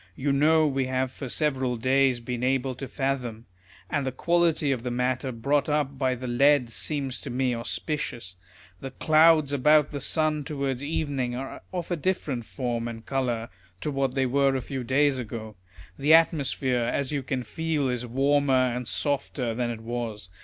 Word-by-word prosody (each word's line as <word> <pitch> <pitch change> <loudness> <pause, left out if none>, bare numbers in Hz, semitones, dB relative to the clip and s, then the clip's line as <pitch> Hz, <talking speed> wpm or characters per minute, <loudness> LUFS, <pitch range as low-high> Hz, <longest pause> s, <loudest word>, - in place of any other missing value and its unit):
You 140 +5 0
know 155 +3 +4
we 135 -3 0
have 130 0 -1
for 135 0 -7
several 130 -4 0
days 130 +1 +2
been 120 0 -4
able 130 0 +1
to 130 +2 -7
fathom; 125 -5 -3 0.4
and 145 -2 -1
the 130 - -2
quality 165 +1 +1
of 130 -4 -1
the 125 - -3
matter 125 +2 -1
brought 140 +6 0
up 145 -2 0
by 130 -2 +1
the 125 +1 -7
lead 125 0 +3
seems 135 -1 -3
to - - -7
me 125 0 0
auspicious. 115 -4 -4 0.4
The 135 - -6
clouds 155 +1 +4
about 150 +2 +4
the 145 - -4
sun 155 +1 +1
towards 140 -3 -3
evening 140 -5 -2
are 135 +2 -6
of 180 -1 -4
a - - +2
different 150 -8 -2
form 120 -2 -3
and 115 -1 -7
colour 120 -4 -1 0.3
to 150 - -2
what 135 -2 -1
they 135 -1 +2
were 135 +1 +2
a 130 - -1
few 130 +1 -5
days 135 +2 +2
ago. 110 -2 -6 0.4
The 150 +3 +6
atmosphere, 140 -6 +2
as 130 +4 -1
you 145 -2 -1
can 130 -1 -3
feel, 155 +4 -1
is 125 -1 -2
warmer 135 0 +2
and 125 -1 -4
softer 135 -4 -1
than 120 +1 -1
it 115 -2 -5
was. 115 -5 -5
135 Hz, 180 wpm, -26 LUFS, 125-145 Hz, 0.4 s, The